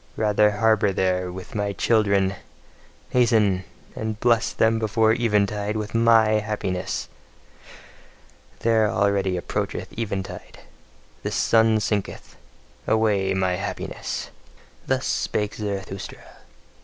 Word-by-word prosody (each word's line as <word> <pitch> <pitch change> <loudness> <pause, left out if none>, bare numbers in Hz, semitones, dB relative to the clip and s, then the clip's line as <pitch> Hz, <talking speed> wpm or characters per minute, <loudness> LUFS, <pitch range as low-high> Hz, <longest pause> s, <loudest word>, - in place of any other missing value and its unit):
Rather 105 -1 +3
harbour 105 0 +2
there 90 -1 0
with 95 +1 -9
my 105 -1 -1
children! 100 -3 +2 0.8
Hasten! 110 -7 +3 0.3
and 110 -1 -4
bless 115 -1 +2
them 110 0 +2
before 110 0 +2
eventide 105 -2 0
with 105 0 -5
MY 115 -2 +4
happiness! 105 -4 -3 1.5
There, 110 -2 +3
already 100 -3 +1
approacheth 90 - -4
eventide: 100 -4 -5 0.6
the - - -3
sun 110 -1 +3
sinketh. 100 -1 -3 0.5
Away 100 -4 +2
my 95 -1 0
happiness! 95 - -5 0.6
Thus - - 0
spake 105 0 -1
Zarathustra. 100 -2 -5
105 Hz, 100 wpm, -23 LUFS, 95-110 Hz, 1.5 s, MY